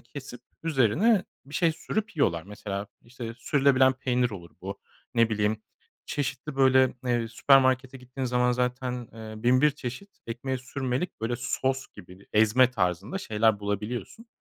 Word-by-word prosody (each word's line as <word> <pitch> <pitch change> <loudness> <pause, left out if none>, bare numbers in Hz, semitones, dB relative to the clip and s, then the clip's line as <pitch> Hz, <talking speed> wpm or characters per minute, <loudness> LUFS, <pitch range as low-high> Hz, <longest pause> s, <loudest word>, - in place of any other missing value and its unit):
kesip 130 -4 -10 0.2
üzerine 165 - +3 0.2
bir 145 - -12
şey 165 0 +3
sürüp 215 +5 -4
yiyorlar. 85 - +2
Mesela, 100 +1 -5 0.2
işte, 120 -1 -8
sürülebilen 135 -2 +4
peynir 125 -1 0
olur 85 -5 -9
bu. 95 +2 -6 0.3
Ne 115 -1 +4
bileyim, 105 0 0 0.4
çeşitli, 140 0 -3
böyle, 130 -1 +5
eee, 120 -2 +1
süpermarkete 130 +1 +3
gittiğin 125 +1 -6
zaman 125 0 +2
zaten, 125 -1 -2
eee, 110 -1 -9
bin 125 +1 +4
bir 150 +1 +5
çeşit 140 +7 -8
ekmeğe 125 +3 -3
sürmelik 130 +4 -3
böyle 115 +2 -1
sos 130 +2 -1
gibi, 90 +3 -14
ezme 110 +4 +5
tarzında 95 - -1
şeyler 110 - +1
bulabiliyorsun. 105 - -4
125 Hz, 140 wpm, -27 LUFS, 110-135 Hz, 0.4 s, böyle